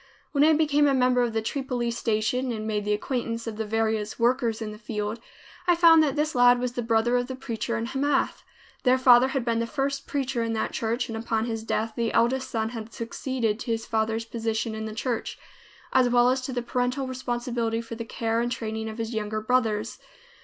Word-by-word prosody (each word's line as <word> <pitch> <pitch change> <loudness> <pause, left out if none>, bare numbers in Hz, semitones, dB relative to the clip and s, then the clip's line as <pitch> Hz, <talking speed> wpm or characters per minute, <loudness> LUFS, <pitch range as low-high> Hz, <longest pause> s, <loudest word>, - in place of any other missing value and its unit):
When 285 -1 +3
I 315 +1 +6
became 295 -1 +3
a 275 - +3
member 250 -1 +3
of 240 -1 +1
the 225 0 -1
Tripoli 250 -1 -2
Station 235 +3 0
and 215 -2 -4
made 210 -1 -1
the 210 - +1
acquaintance 230 +1 -2
of 225 -2 -5
the 220 -1 -3
various 220 -1 -1
workers 235 -1 +1
in 220 -2 -4
the 210 - -10
field, 210 0 -4 0.5
I 350 - +5
found 330 -1 +7
that 300 -3 +1
this 305 +1 0
lad 245 0 +6
was 250 0 -1
the 245 - -2
brother 230 +1 +2
of 245 0 -1
the 260 - -5
preacher 235 -3 -3
in 230 - -2
Hamath. 275 +4 0 0.4
Their 255 0 +4
father 255 -1 +6
had 265 -2 -2
been 230 -1 +1
the 230 - -1
first 275 +1 -2
preacher 270 -3 -1
in 230 0 -1
that 220 - -1
church, 230 +2 -1
and 225 - -5
upon 225 0 -1
his 225 -2 -3
death 225 0 -1
the 230 -1 0
eldest 255 +3 +2
son 220 -3 -1
had 225 -1 -7
succeeded 230 -1 -2
to 235 - -4
his 225 0 -3
father's 225 0 -1
position 225 0 -2
in 220 0 -4
the 215 -1 -6
church, 235 +1 -3 0.6
as 255 -1 +4
well 245 0 +5
as 260 0 0
to - - -4
the 245 -1 -2
parental 250 +2 -1
responsibility 240 -3 -2
for 230 0 -7
the 230 0 -5
care 225 0 -1
and 240 0 -1
training 220 -1 -3
of 220 - -8
his 230 0 -3
younger 215 0 -2
brothers. 220 -1 0
235 Hz, 220 wpm, -26 LUFS, 225-255 Hz, 0.6 s, found